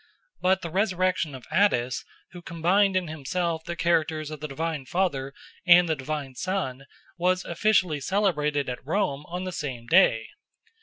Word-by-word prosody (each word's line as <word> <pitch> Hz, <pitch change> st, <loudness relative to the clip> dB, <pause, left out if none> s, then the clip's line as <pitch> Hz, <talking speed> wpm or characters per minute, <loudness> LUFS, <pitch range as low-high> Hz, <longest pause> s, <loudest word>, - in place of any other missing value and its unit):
But 190 Hz, +1 st, +2 dB
the 170 Hz, -, -5 dB
resurrection 185 Hz, -5 st, 0 dB
of 130 Hz, -, -11 dB
Attis, 130 Hz, -11 st, +2 dB, 0.3 s
who 180 Hz, -, -10 dB
combined 180 Hz, +4 st, +2 dB
in 185 Hz, -2 st, +1 dB
himself 160 Hz, +2 st, -2 dB
the 170 Hz, -, -4 dB
characters 155 Hz, -3 st, 0 dB
of 155 Hz, -, -7 dB
the 155 Hz, -, -5 dB
divine 150 Hz, -1 st, -4 dB
Father 145 Hz, -7 st, -1 dB, 0.4 s
and 175 Hz, 0 st, +7 dB
the 160 Hz, -, +1 dB
divine 140 Hz, -1 st, -5 dB
Son, 135 Hz, -5 st, -3 dB, 0.3 s
was 180 Hz, +1 st, +1 dB
officially 175 Hz, -3 st, +2 dB
celebrated 150 Hz, -5 st, 0 dB
at 125 Hz, -1 st, -5 dB
Rome 150 Hz, -3 st, -1 dB
on 180 Hz, +2 st, -4 dB
the 185 Hz, -, -4 dB
same 135 Hz, -8 st, -5 dB
day. 120 Hz, -8 st, +4 dB
165 Hz, 155 wpm, -26 LUFS, 145-185 Hz, 0.4 s, and